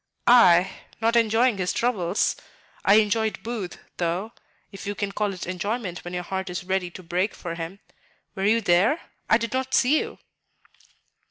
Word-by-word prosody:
"I? 190 -7 +6 0.3
Not 230 +1 +1
enjoying 230 -1 +3
his 180 -1 0
troubles; 200 -6 0 0.5
I 200 - +6
enjoyed 220 0 +1
Booth, 220 -6 -5 0.2
though, 180 +6 -2 0.4
if 195 -1 -9
you 205 - -2
can 200 0 -3
call 205 0 -1
it 185 -2 -6
enjoyment 185 +1 -3
when 175 +1 -6
your 180 - -3
heart 190 +1 -4
is 175 -1 -4
ready 185 -1 -1
to 185 +1 -11
break 180 +4 -1
for 170 -2 -6
him. 170 +3 -6 0.5
Were 195 - -2
you 225 +3 +3
there? 200 - +3 0.3
I 225 - +6
did 230 -1 -4
not 260 0 -1
see 275 +5 +4
you." - - -5
200 Hz, 170 wpm, -25 LUFS, 180-225 Hz, 0.5 s, I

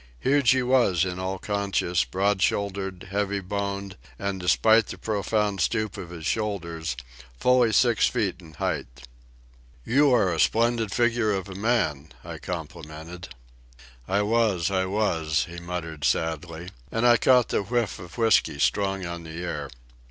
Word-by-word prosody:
Huge 140 - +3
he 130 -1 +4
was 120 -9 +3
in 90 0 -4
all 95 +1 -2
conscience, 100 -3 0
broad 95 +1 0
shouldered, 95 -2 -1
heavy 100 0 0
boned, 100 0 -4 0.2
and, 100 -1 -3
despite 110 +6 +4
the - - -7
profound 105 -2 -1
stoop 110 +3 0
of 95 -5 -7
his 85 -2 -8
shoulders, 85 - -2 0.4
fully 125 -2 +4
six 120 0 +4
feet 105 -8 -1
in 80 -3 -14
height. 60 +1 -4 0.8
"You 140 +3 +4
are 95 -8 +3
a 80 - -3
splendid 115 +4 +2
figure 120 -1 +2
of 95 -1 -2
a - - -7
man," 95 - -1
I - - -8
complimented. 80 0 -7 0.8
"I 100 +2 +1
was, 105 -5 +1
I 95 -1 +1
was," 80 -8 0
he 85 0 -8
muttered 85 -3 -6
sadly, 80 +2 -1 0.2
and 115 +1 0
I 120 -1 +7
caught 125 +1 +4
the - - +1
whiff 115 0 -1
of 90 +2 -11
whiskey 115 -10 +3
strong 95 +4 0
on 85 0 -5
the 80 +2 -7
air. 75 -5 -4
95 Hz, 150 wpm, -25 LUFS, 85-110 Hz, 0.8 s, I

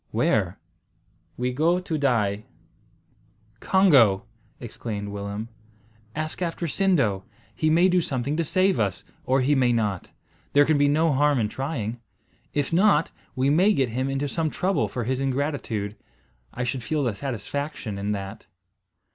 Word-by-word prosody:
"Where?" - - +1 0.8
"We 125 +1 -1
go 165 +6 +2
to 180 -3 -4
die." 110 -8 +1 1.1
"Congo!" 130 - +4 0.3
exclaimed 105 -3 -6
Willem, 100 +2 -5 0.7
"ask 155 +3 -4
after 170 0 -2
Sindo. 145 - +1 0.3
He 155 - 0
may 170 +4 +5
do 180 -1 +3
something 140 -1 -2
to 165 - 0
save 185 -1 +2
us, 100 -4 -1 0.2
or 130 +1 +2
he 140 +3 +2
may 130 -3 +3
not. 105 -6 -1 0.4
There 145 0 +6
can 155 -1 +2
be 145 - +4
no 155 +2 +3
harm 145 +1 +3
in 105 -2 0
trying. 120 -4 -4 0.5
If 145 +1 -1
not, 190 -1 +4 0.2
we 135 +2 +2
may 185 +8 +4
get 135 -8 +1
him 130 +4 -2
into 135 +1 -1
some 160 +2 -1
trouble 190 +5 0
for 120 - -4
his 130 +3 -1
ingratitude. 135 -7 -2 0.6
I 125 - -4
should 125 +1 -2
feel 150 +3 -1
a 115 - 0
satisfaction 135 -2 -4
in 100 +1 -2
that." 100 +1 -7
135 Hz, 150 wpm, -25 LUFS, 110-155 Hz, 1.1 s, There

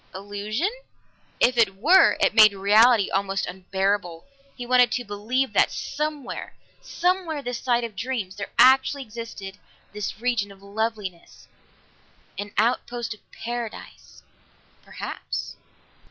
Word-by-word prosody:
Illusion? 205 - -3 0.7
If 245 -1 +3
it 205 -4 +3
were, 325 - +5
it - - +3
made 215 -2 +7
reality 210 +3 +4
almost 195 0 -1
unbearable; 190 -1 -2 0.3
he 245 - -7
wanted 250 0 +4
to 245 - -1
believe 225 +6 -2
that - - +3
somewhere 300 -3 -5 0.3
somewhere 350 -4 -1
this 245 -2 -4
side 240 -2 +1
of 230 -3 -6
dreams, 220 -4 -4
there 200 - -6
actually 265 +2 +5
existed 215 -4 -8 0.3
this 210 -1 -5
region 235 -4 -1
of 195 0 -16
loveliness. 205 -3 -5 0.9
An 205 0 -5
outpost 235 +1 0
of 210 - -17
Paradise? 235 -1 -7 0.6
Perhaps. - - -6
225 Hz, 120 wpm, -24 LUFS, 200-250 Hz, 0.9 s, made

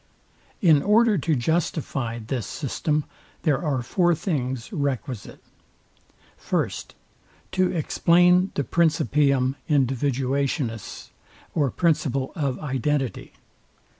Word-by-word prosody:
In 155 -5 +6
order 220 +3 +4
to 155 +2 +1
justify 135 -4 -1
this 115 +1 -4
system, 150 +1 -2 0.4
there 150 -5 +2
are 135 -6 -1
four 175 +5 +2
things 130 - -3
requisite. 135 - -4 0.9
First, - - -3 0.6
To 185 -1 +1
explain 180 +3 +3
the 145 - 0
PRINCIPIUM 145 -5 +2
INDIVIDUATIONIS, 135 - -1 0.4
or 145 -4 +1
principle 140 -4 0
of 140 -6 -2
identity. 135 -1 -2
145 Hz, 90 wpm, -24 LUFS, 130-165 Hz, 0.9 s, In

